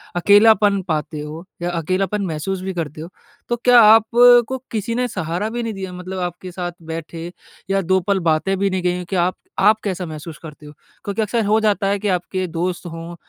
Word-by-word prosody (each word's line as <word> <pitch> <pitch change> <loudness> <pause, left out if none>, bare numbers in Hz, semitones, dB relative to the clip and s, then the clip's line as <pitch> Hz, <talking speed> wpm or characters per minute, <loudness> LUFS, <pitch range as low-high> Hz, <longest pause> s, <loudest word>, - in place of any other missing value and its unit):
अकेलापन 205 +2 +5
पाते 155 -2 -2
हो 155 +3 -7 0.2
या 175 - -1
अकेलापन 185 +4 -1
महसूस 180 +3 -3
भी 190 0 -4
करते 155 -3 -5
हो। 165 - -8 0.4
तो 240 - +1
क्या 245 +1 +5
आप 220 0 +7 0.4
को 260 - -3
किसी 225 +1 -2
ने 250 +1 0
सहारा 185 0 -3
भी 240 +1 -4
नहीं 225 -1 -3
दिया 190 -2 -6
मतलब 185 +1 -6
आपके 180 +1 -5
साथ 175 0 -4
बैठे 165 +1 -7 0.4
या 195 0 +1
2 190 +1 +2
पल 200 -1 +2
बातें 160 +5 +1
भी 200 0 +1
नहीं 185 -1 -2
कहीं 180 0 0
हो 180 - -6
कि, 195 - -2
आप 180 +1 +1 0.2
आप 210 +3 +4
कैसा 185 -3 -3
महसूस 155 0 -8
करते 155 -1 -11
हो? 150 - -10 0.3
क्योंकि 200 +2 -2
अक्सर 220 +1 0
हो 215 +2 +3
जाता 205 -2 +1
है 200 +1 0
कि 210 - -3
आपके 185 +1 -1
दोस्त 175 +2 -3
हों 165 0 -7
185 Hz, 210 wpm, -20 LUFS, 170-205 Hz, 0.4 s, आप